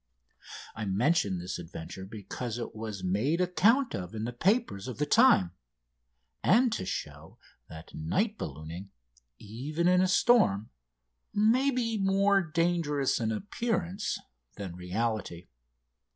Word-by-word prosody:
I 110 -1 -4
mention 100 - +1
this 90 +1 -5
adventure 85 +2 -8
because 110 +3 -6
it 120 - -6
was 110 -3 -6
made 110 - +1
account 215 +9 +3
of 90 +2 -5
in 110 - -3
the 120 +2 -3
papers 120 - 0
of 125 - -6
the 150 - 0
time, 150 - +5 0.9
and 235 +4 +4
to 95 - -3
show - - -6 0.3
that 80 +1 -11
night 200 - -1
ballooning, 80 - -7 0.5
even 140 +11 -3
in 180 0 +5
a 185 - +3
storm, 185 - +3 0.6
may 230 +6 +4
be 230 -4 -1
more 195 0 +3
dangerous 165 -4 0
in 110 -1 -1
appearance 200 - -2 0.4
than 95 -4 -6
reality. 90 -1 -3
125 Hz, 125 wpm, -29 LUFS, -, 0.9 s, time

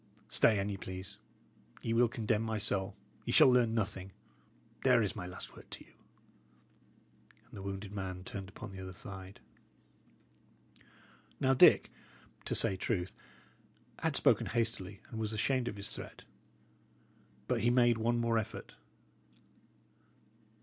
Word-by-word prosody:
Stay, 110 - +4
an 100 0 0
ye 100 -1 -3
please. 95 +2 -7 0.7
Ye 115 - 0
will 120 +1 +5
condemn 110 -2 0
my 110 -1 -1
soul 100 -2 -1 0.3
ye - - -2
shall 130 - +7
learn 120 -2 +3
nothing! 95 -3 -2 0.7
There 125 -3 +5
is 100 - -1
my 95 -4 -5
last 90 - -7
word - - -14
to - - -8
you." - - -23 1.5
And - - -26
the 100 - -7
wounded 100 +1 -5
man 95 -2 -4
turned 95 0 -6
upon 105 +1 -9
the 95 -1 -8
other 95 0 -7
side. 95 +1 -9 2.0
Now, 135 0 +3
Dick, 130 - +6 0.5
to - - -1
say 95 - +5
truth, 95 -2 -1 0.9
had - - 0
spoken - - +4
hastily, 110 -5 -2
and 110 - -5
was 110 0 -2
ashamed 125 +3 +1
of - - -3
his 100 0 -5
threat. - - -9 1.2
But - - +1
he 120 - +3
made 120 -2 +4
one 120 +2 +2
more 115 -1 +2
effort. 110 +1 -6
105 Hz, 145 wpm, -33 LUFS, 95-115 Hz, 2.0 s, shall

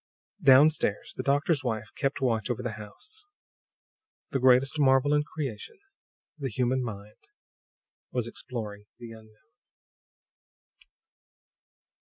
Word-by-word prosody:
Down 140 +1 +7
stairs, 105 -9 -3
the - - -3
doctor's 145 +3 +1
wife 110 -3 -3
kept 135 -1 -2
watch 115 -3 0
over 120 - -2
the - - -2
house. 415 - -11 1.1
The 135 - 0
greatest 130 +4 +4
marvel 135 +1 +4
in 150 - +3
creation, 150 - -6 0.6
the 135 -2 -3
human 125 +2 0
mind, 105 - -9 0.8
was 125 -3 -1
exploring 105 -4 -6
the 120 -1 -10
unknown. 110 +6 -17
130 Hz, 110 wpm, -28 LUFS, 110-140 Hz, 1.1 s, Down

